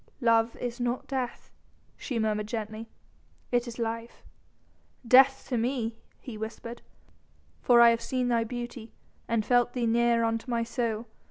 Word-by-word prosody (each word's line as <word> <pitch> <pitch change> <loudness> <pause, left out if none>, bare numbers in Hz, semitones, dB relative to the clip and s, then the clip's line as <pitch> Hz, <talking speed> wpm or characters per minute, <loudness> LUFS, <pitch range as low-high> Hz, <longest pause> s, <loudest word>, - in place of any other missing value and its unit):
"Love 230 -1 +3
is 245 0 -5
not 245 +1 -2
death," 260 -3 -4 0.4
she 255 - -4
murmured 215 -1 0
gently. 220 0 -5 0.6
"It 245 0 +1
is 235 - -7
life." 230 0 -4 0.8
"Death 265 +2 +6
to 245 -3 0
me," 230 -2 -2 0.2
he 225 -4 -9
whispered, 230 +2 -7 0.8
"for 240 -1 +5
I 235 0 +8
have 230 0 -1
seen 255 +1 -1
thy 235 -2 +2
beauty 240 -1 -7 0.3
and 230 -2 0
felt 245 0 +3
thee 245 -2 -1
near 235 0 +3
unto 225 +2 -1
my 235 -1 0
soul. 230 -1 -2
235 Hz, 150 wpm, -28 LUFS, 225-245 Hz, 0.8 s, I